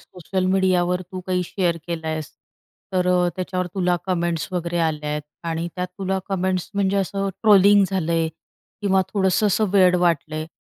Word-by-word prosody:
Social 185 +1 -4
मीडियावर 180 -1 +2
तू 185 - -4
काही 180 -1 0
share 175 -2 -1
केल 170 -2 -4
आहेस 155 -1 -3 0.6
तर 180 -1 +1
अ, 180 -1 +3
त्याच्यावर 180 0 -2
तुला 180 -2 +1
कमेंट्स 170 -3 -1
वगैरे 175 -1 -2
आल्या 150 -1 -4
आहेत 150 0 -2 0.2
आणि 165 +1 -2
त्यात 180 0 -2
तुला 190 0 -1
कमेंट्स 185 -2 -1
म्हणजे 200 0 +1
असं 195 0 -1
ट्रोलिंग 205 -1 +6
झालंय 165 -3 0 0.5
किंवा 190 -2 +3
थोडंसं 195 +1 +2
असं 210 +1 +2
वेड 185 -2 +5
वाटलंय? 155 -1 -1
180 Hz, 160 wpm, -22 LUFS, 170-190 Hz, 0.6 s, ट्रोलिंग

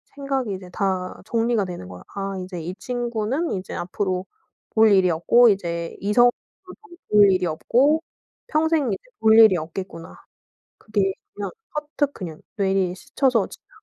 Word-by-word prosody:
생각이 270 -6 -2
이제 185 -1 -8
다 190 -2 -2
정리가 230 -2 +1
되는 175 - -7
거야. 90 0 -10
'아 195 -1 -3
이제 180 -2 -7
이 175 +3 -5
친구는 240 - -2
이제 190 -1 -4
앞으로 185 +1 -2 0.4
볼 220 -1 +4
일이 190 -2 +5
없고 230 +9 +5
이제 170 -4 -2
이성으로도 240 +5 +4 0.8
볼 205 -2 +7
일이 185 -1 +1
없고 270 - +2 0.5
평생 310 -3 +1
이제 - - -6 0.2
볼 220 0 +5
일이 215 -5 +7
없겠구나.' 165 +1 -7 0.6
그게 200 -3 0 0.2
그냥 205 - -4 0.2
퍼뜩 295 -1 -2
그냥 165 -5 -7 0.2
뇌리에 190 -2 +1
스쳐서 245 +3 +1
지나갔고 435 - -17
200 Hz, 310 characters per minute, -23 LUFS, 185-240 Hz, 0.8 s, 볼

